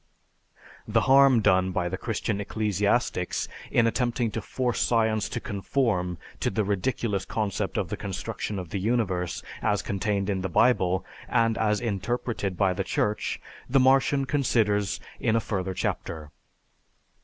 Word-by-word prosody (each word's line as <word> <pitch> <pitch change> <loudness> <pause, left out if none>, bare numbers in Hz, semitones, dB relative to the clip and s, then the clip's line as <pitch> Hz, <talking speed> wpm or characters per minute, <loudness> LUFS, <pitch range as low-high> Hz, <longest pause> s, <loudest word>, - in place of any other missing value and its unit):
The - - +3
harm 135 -3 +6
done 95 -2 +3
by 90 -1 -1
the 90 - -2
Christian 105 0 -2
ecclesiastics 105 -2 0 0.2
in 120 - +3
attempting 120 0 0
to 115 - -3
force 125 +4 -2
science 110 -2 +2
to - - -3
conform 100 -4 -1 0.2
to - - +1
the 110 +2 0
ridiculous 100 +1 -1
concept 105 -2 -2
of 90 - -1
the 105 - -3
construction 100 +1 -4
of 90 -3 -5
the 100 - -3
universe 95 -5 -1 0.2
as 105 -1 +1
contained 100 0 -1
in 95 -2 -1
the 95 - -2
Bible, 95 -3 +3 0.2
and 115 -2 +2
as 105 -2 +1
interpreted 110 -2 -2
by 95 -2 +3
the 95 - -2
Church, 105 +2 -1 0.3
the 135 +2 +4
Martian 135 +1 +4
considers 110 -8 +1 0.2
in 110 - +1
a - - +4
further 95 -4 -3
chapter. 80 -4 -3
105 Hz, 145 wpm, -26 LUFS, 95-115 Hz, 0.3 s, harm